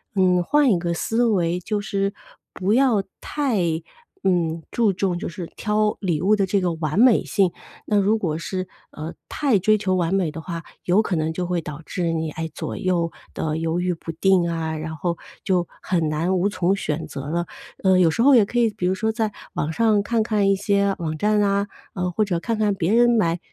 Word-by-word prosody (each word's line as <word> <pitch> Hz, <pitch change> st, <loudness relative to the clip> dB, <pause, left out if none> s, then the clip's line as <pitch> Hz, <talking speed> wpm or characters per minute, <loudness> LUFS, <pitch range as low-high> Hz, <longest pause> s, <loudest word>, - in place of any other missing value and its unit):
嗯， 180 Hz, -2 st, +3 dB
换 290 Hz, +3 st, +3 dB
一 180 Hz, -, +2 dB
个 170 Hz, 0 st, -1 dB
思 225 Hz, +7 st, 0 dB
维， 180 Hz, -6 st, +1 dB
就 205 Hz, +3 st, -2 dB
是 200 Hz, -1 st, -1 dB, 0.4 s
不 190 Hz, +2 st, -1 dB
要 245 Hz, -6 st, +3 dB, 0.2 s
太 275 Hz, -8 st, -1 dB, 0.6 s
嗯， 170 Hz, -3 st, +1 dB
注 225 Hz, -4 st, +2 dB
重 185 Hz, -1 st, -1 dB
就 -, -, -4 dB
是 175 Hz, +1 st, -6 dB
挑 210 Hz, 0 st, +1 dB
礼 170 Hz, -6 st, 0 dB
物 205 Hz, +3 st, +4 dB
的 200 Hz, -2 st, +1 dB
这 195 Hz, +1 st, +1 dB
个 180 Hz, -2 st, 0 dB
完 160 Hz, +3 st, -2 dB
美 245 Hz, -2 st, +6 dB
性。 195 Hz, -4 st, +1 dB, 0.3 s
那 210 Hz, -, +1 dB
如 205 Hz, +3 st, +3 dB
果 160 Hz, -6 st, -2 dB
是， 185 Hz, +2 st, -4 dB, 0.2 s
呃， 155 Hz, +2 st, -6 dB, 0.2 s
太 275 Hz, -8 st, +2 dB
追 215 Hz, +3 st, +3 dB
求 190 Hz, -3 st, 0 dB
完 175 Hz, 0 st, 0 dB
美 185 Hz, -5 st, +1 dB
的 160 Hz, -, -7 dB
话， 165 Hz, -1 st, -6 dB, 0.2 s
有 185 Hz, +4 st, +3 dB
可 200 Hz, -4 st, -2 dB
能 160 Hz, 0 st, 0 dB
就 180 Hz, +2 st, -3 dB
会 175 Hz, -1 st, -1 dB
导 150 Hz, 0 st, -7 dB
致 170 Hz, -3 st, -2 dB
你， 160 Hz, -1 st, -1 dB
哎， 165 Hz, +1 st, -4 dB
左 -, -, -5 dB
右 175 Hz, -2 st, 0 dB, 0.2 s
地 155 Hz, -1 st, -2 dB
犹 165 Hz, +1 st, -1 dB
豫 180 Hz, 0 st, 0 dB
不 165 Hz, 0 st, -7 dB
定 175 Hz, +1 st, +2 dB
啊， 160 Hz, -1 st, -2 dB
然 160 Hz, +1 st, -5 dB
后 170 Hz, +1 st, -2 dB, 0.3 s
就 180 Hz, -3 st, +2 dB, 0.2 s
很 165 Hz, -4 st, 0 dB
难 165 Hz, +5 st, 0 dB
无 195 Hz, +3 st, +2 dB
从 185 Hz, -1 st, +1 dB
选 160 Hz, -4 st, -3 dB
择 140 Hz, -2 st, -6 dB
了。 170 Hz, +2 st, -1 dB, 0.4 s
呃， 190 Hz, -1 st, +5 dB
有 170 Hz, -3 st, +5 dB
时 230 Hz, -, -1 dB
候 275 Hz, +1 st, +7 dB
也 225 Hz, -, +7 dB
可 240 Hz, +4 st, -1 dB
以， 230 Hz, -, +4 dB
比 180 Hz, -, -4 dB
如 185 Hz, -, +2 dB
说 220 Hz, +4 st, -1 dB
在 220 Hz, -2 st, -1 dB, 0.2 s
网 155 Hz, -, -2 dB
上 215 Hz, +1 st, +2 dB
看 225 Hz, +2 st, +1 dB
看 210 Hz, -3 st, +1 dB
一 195 Hz, -, +4 dB
些 200 Hz, 0 st, +1 dB
网 155 Hz, -3 st, -3 dB
站 210 Hz, +5 st, +2 dB
啊， 200 Hz, 0 st, +1 dB, 0.3 s
呃， 180 Hz, -1 st, -2 dB
或 215 Hz, +5 st, +1 dB
者 180 Hz, -4 st, -1 dB
看 225 Hz, +5 st, -2 dB
看 210 Hz, -2 st, +2 dB
别 190 Hz, +1 st, 0 dB
人 240 Hz, +1 st, +5 dB
买 175 Hz, -8 st, +2 dB
185 Hz, 235 characters per minute, -23 LUFS, 170-210 Hz, 0.6 s, 候